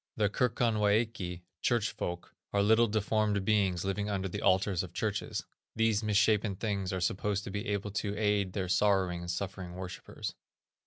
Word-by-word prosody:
The 105 -2 +3
Kirkonwæki 110 -5 +1 0.2
(church 120 -3 +1
folk) 85 0 -5 0.2
are 100 0 +3
little 110 +3 +5
deformed 105 -1 +1
beings 95 -4 +2
living 100 +2 -1
under 95 -1 -1
the 90 - -5
altars 95 -1 +3
of 90 -3 -8
churches. 105 -2 -2 0.3
These 115 -1 +2
misshapen 105 -1 +2
things 100 -2 -2
are 95 - -1
supposed 100 +3 0
to 100 - -6
be 100 +4 -3
able 100 0 -2
to 105 -1 -3
aid 105 -3 +1
their 95 -3 -2
sorrowing 95 -2 +2
and 85 - -6
suffering 90 -1 -4
worshipers. 90 0 -6
100 Hz, 160 wpm, -31 LUFS, 95-105 Hz, 0.3 s, little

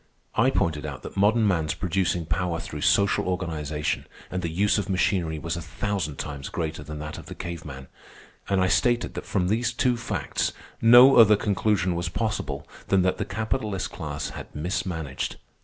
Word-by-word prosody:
I 130 +4 +4
pointed 85 - 0
out 75 -3 -6
that - - -8
modern 105 +3 +3
man's 80 -6 +1
producing 90 -2 0
power 85 0 -1
through 75 -2 -6
social 100 +3 +3
organization 80 -5 -2 0.2
and 90 - -2
the 85 - -2
use 100 +6 +2
of 100 0 -4
machinery 90 -3 +1
was 85 +2 -3
a 85 - -4
thousand 90 -2 -3
times 70 -2 -5
greater 80 -2 -3
than 75 0 -7
that 75 +1 -6
of - - -12
the - - -8
cave 85 -2 -6
man. 65 -3 -8 0.6
And 100 -1 +2
I 95 - +3
stated 120 +5 +2
that - - -6
from 90 -3 0
these 115 +4 +1
two 125 0 +1
facts 120 - -2 0.3
no 120 +4 +8
other 110 -2 +8
conclusion 100 -2 +1
was 85 0 -2
possible 110 +4 -3 0.2
than 95 -2 +3
that 95 - +1
the 100 - -1
capitalist 110 -3 -2
class 75 -3 -4
had - - -9
mismanaged. 80 -3 -3
90 Hz, 180 wpm, -26 LUFS, 80-105 Hz, 0.6 s, no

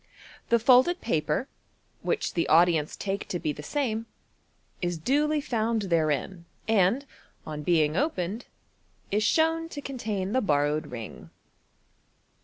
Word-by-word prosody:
The 235 - +5
folded 255 +9 +5
paper, 155 - -1 0.5
which 470 - -1
the 170 - 0
audience 165 -2 +4
take 200 0 -3
to 175 - -2
be 155 -3 -2
the 150 - -9
same, 230 - -2 0.7
is 175 -2 -1
duly 295 - +1
found 230 -5 -1
therein, 170 0 0 0.2
and, 225 +5 +3 0.4
on 150 -1 -5
being 155 -1 +2
opened, 220 - -1 0.7
is 210 +2 +2
shown 325 +7 +2
to 295 - -6
contain 215 -9 -3
the 260 +3 +2
borrowed 150 -3 +1
ring. 115 -5 -8
200 Hz, 125 wpm, -27 LUFS, 160-255 Hz, 0.7 s, The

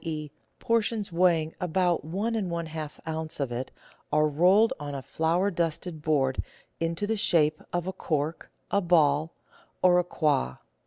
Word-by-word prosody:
e., 155 -3 -4 0.3
por 230 0 +2
tions 210 -2 -3
weighing 170 -2 +2
about 180 0 +1
one 195 +9 -2
and 200 -5 -1
one 170 -1 -2
half 155 -2 -6
oz. 160 -1 -4
of 135 -3 -1
it, 125 +2 -3 0.4
are 150 0 +4
rolled 180 +9 +4
on 145 -1 -5
a 135 - -4
flour 170 +8 +1
dusted 170 -1 -2
board 140 -4 +1 0.4
into 165 +4 -1
the 225 +2 0
shape 155 -6 +2
of 175 -1 -1
a 190 - -3
cork, 155 -1 -2 0.2
a 200 - +3
ball, 160 -3 +3 0.5
or 180 -1 +6
a - - +2
quoit. 150 - 0
165 Hz, 165 wpm, -27 LUFS, 150-180 Hz, 0.5 s, or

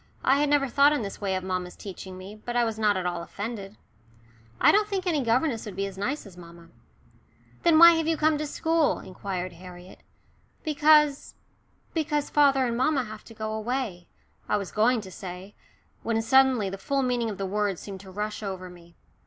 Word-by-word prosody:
I 270 +2 +4
had 295 0 +2
never 285 -1 +3
thought 280 +4 +4
in 290 - -1
this 200 0 -7
way 195 -2 -1
of 185 - -3
mamma's 185 -1 -3
teaching 190 -1 -9
me, 190 +2 -9
but 240 +3 -7
I 240 - +3
was 225 -1 -2
not 210 -2 +2
at 185 - -3
all 175 -1 -2
offended. 205 +2 -6 0.8
"I - - +6
don't 420 0 +3
think 390 -3 -3
any 320 -5 +1
governess 240 +1 +1
would 200 - -7
be 195 +1 -1
as 195 -1 -7
nice 235 +10 -3
as 195 -3 -13
mamma." 170 -1 -14 0.9
"Then 335 -2 +4
why 340 +1 +10
have 325 -1 0
you 325 -1 +1
come 305 -1 +2
to 305 - -2
school?" 325 0 +1
inquired 185 -1 -5
Harriet. 180 +1 -12 0.6
"Because" 300 -1 +3 0.6
"because 295 -3 -1
father 275 -3 +4
and 235 -1 -1
mamma 265 +2 +1
have 215 -1 -9
to 225 - -13
go 215 0 -4
away," 220 -6 -3 0.4
I - - +2
was 200 -2 -5
going 225 +2 +2
to 190 -2 -11
say, 185 +2 -9 0.5
when 225 -1 0
suddenly 265 -3 +4
the 195 0 -6
full 275 +3 -1
meaning 245 -2 0
of 205 - -6
the 195 - -3
words 205 -1 -1
seemed 195 -2 -8
to 190 0 -13
rush 210 +3 -4
over 190 -3 -6
me. 170 -1 -17
220 Hz, 200 wpm, -26 LUFS, 190-280 Hz, 0.9 s, why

